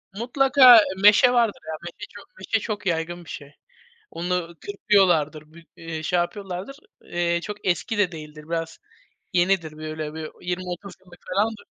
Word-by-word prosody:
Mutlaka 255 +1 +6 0.2
meşe 210 +5 +7
vardır 235 -4 +1
y,a 160 - -4
meşe 175 0 -8
çok - - -13
meşe 225 - 0
çok 210 -2 -5
yaygın 175 0 -2
bir - - -14
şey, 145 -1 -9 0.6
onu 175 0 -3
kırpıyorlardır, 165 -7 +1
bir, 170 0 -15
eee, 165 -1 -7
şey, 180 +2 +1
yapıyorlardır. 195 +7 -5 0.3
Eee, 170 0 -1
çok 210 +4 -6
eski 200 +5 0
de 200 -3 +2
değildir, 150 -2 -10
biraz 165 -1 -4 0.5
yenidir 175 -3 +1
böyle 155 0 -6
bir 160 -1 -6
20-30 180 +2 -5
yıllık 175 -1 -17
falandır. 210 +3 0
175 Hz, 150 wpm, -24 LUFS, 165-205 Hz, 0.6 s, meşe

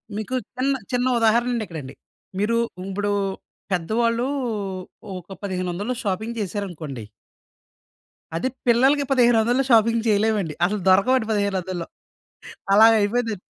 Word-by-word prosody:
మీకు 215 +4 -3 0.2
చిన్న 270 +2 +1 0.2
చిన్న 250 0 +1
ఉదాహరణండి 235 +1 +2
ఇక్కడండి. 150 -6 -8 0.5
మీరు 220 +3 +1 0.3
ఇప్పుడు 205 +1 -1 0.6
పెద్దవాళ్ళూ 230 +7 0 0.9
ఒక 185 +2 -10
1,500లో 185 +4 -3
షాపింగ్ 220 +4 -3
చేశారనుకోండి. 175 - -5 1.3
అదే 170 +10 -1 0.2
పిల్లలకి 265 +5 +4
1,500లో 240 0 +4
షాపింగ్ 230 -1 +4
చేయలేమండి. 210 -5 +1
అసలు 205 +1 -1
దొరకవండి 220 +6 +4
1,500లో. 190 -4 -1 0.9
అలాగయిపోయిందండి. 220 0 +4
215 Hz, 95 wpm, -23 LUFS, 190-235 Hz, 1.3 s, పిల్లలకి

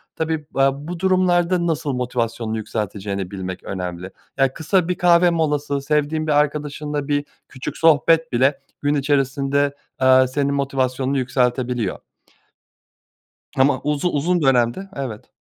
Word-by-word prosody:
Tabii, 160 -1 -2
aaa, 135 +2 +1
bu 175 0 -5
durumlarda 180 -1 +2
nasıl 155 -3 -1
motivasyonunu 120 -3 -2
yükselteceğini 100 -3 -4
bilmek 95 -2 -6
önemli. 90 -1 -5 0.3
Ya, 135 -1 +2
kısa 165 +2 +1
bir 180 - 0
kahve 175 0 +4
molası, 150 -4 0
sevdiğin 150 +2 0
bir - - +1
arkadaşınla 150 0 -2
bir 145 -1 0 0.2
küçük 130 -2 -6
sohbet 165 +1 +4
bile 130 +3 +2 0.2
gün 145 0 +1
içerisinde, 140 0 +1 0.3
eee, 130 0 +6
senin 140 +2 -1
motivasyonunu 135 -1 -1
yükseltebiliyor. 125 -4 0 1.6
Ama 135 +2 +3
uzu 150 +3 0
uzun 170 +3 0
dönemde, 135 +7 +2
evet 125 -6 -6
140 Hz, 125 wpm, -21 LUFS, 125-155 Hz, 1.6 s, eee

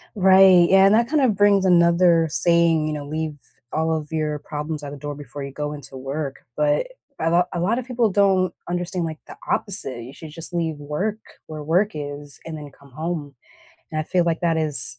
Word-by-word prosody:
Right, 190 -2 +6
yeah, 195 0 +6
and 200 +2 +5
that 235 +1 +3
kind 300 +2 +1
of 245 -6 +3
brings 200 -1 +4
another 170 -1 +4
saying, 170 -1 +3
you 155 - -2
know 145 -1 -5
"Leave 155 0 -3 0.3
all 160 +1 0
of 155 -1 -4
your 155 -2 -1
problems 150 +1 -5
at 140 - -6
the 145 - -8
door 145 +1 -5
before 145 0 -8
you 140 - -6
go 150 +2 -4
into 140 -2 -9
work." 135 +1 -4 0.2
But, 150 -1 +1 0.3
a 165 - +2
lot 175 +1 +3
a 175 - -2
lot 200 +7 +1
of 255 - -6
people 240 -3 +1
don't 190 -2 +2
understand, 175 0 -2
like, 160 -1 -6
the - - -10 0.2
opposite, 135 - -2
you 130 +3 -10
should 155 0 -11
just 165 +3 -8
leave 165 -3 -1
work 150 +9 -3 0.3
where 155 -1 -7
work 180 +7 +2
is 145 -1 -7
and 160 -1 -6
then 145 -2 -9
come 140 -1 -19
home, 155 -1 -4 0.6
and 155 - -2
I - - -3
feel 180 +1 +1
like 165 -1 0
that 170 -2 +1
is 145 -6 +1
160 Hz, 215 wpm, -22 LUFS, 150-180 Hz, 0.6 s, Right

